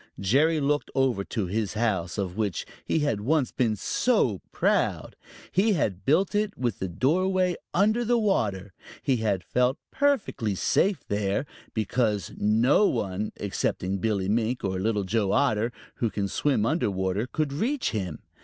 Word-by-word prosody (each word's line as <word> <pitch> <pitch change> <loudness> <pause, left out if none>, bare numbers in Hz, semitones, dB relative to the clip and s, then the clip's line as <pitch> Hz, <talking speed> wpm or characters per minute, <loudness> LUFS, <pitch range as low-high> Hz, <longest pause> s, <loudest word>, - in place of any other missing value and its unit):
Jerry 145 - +3
looked 145 +1 0
over 130 -7 +2
to 110 -5 -2
his 105 +3 -2
house, 105 -6 -1
of 95 -3 -2
which 105 -5 -2 0.2
he 160 - 0
had 145 -9 0
once 140 +2 +1
been 115 -4 +1
so 120 - +1
proud. - - 0 0.4
He 205 +4 +3
had 100 - -1
built 185 +9 +3
it 210 -1 0
with 120 -5 -2
the 95 - -2
doorway 180 - +1 0.2
under 215 +6 +2
water. 105 - 0 0.3
He 130 - +2
had 100 -5 0
felt 125 - +1
perfectly 220 - 0
safe 185 - +1
there, 105 +4 0 0.3
because 110 -1 0
no 120 - +3
one 105 -2 -2
excepting 95 -1 -2
Billy 100 -2 0
Mink 115 +4 0
or 95 -1 -1
Little 105 +1 0
Joe 100 0 0
Otter, 115 -4 +2 0.3
who 115 - 0
can 100 -1 -2
swim 130 0 +1
under 155 -2 +1
water, 95 +3 -1
could 150 0 -2
reach 245 - 0
him. 95 -8 -4
115 Hz, 155 wpm, -26 LUFS, 100-150 Hz, 0.4 s, Jerry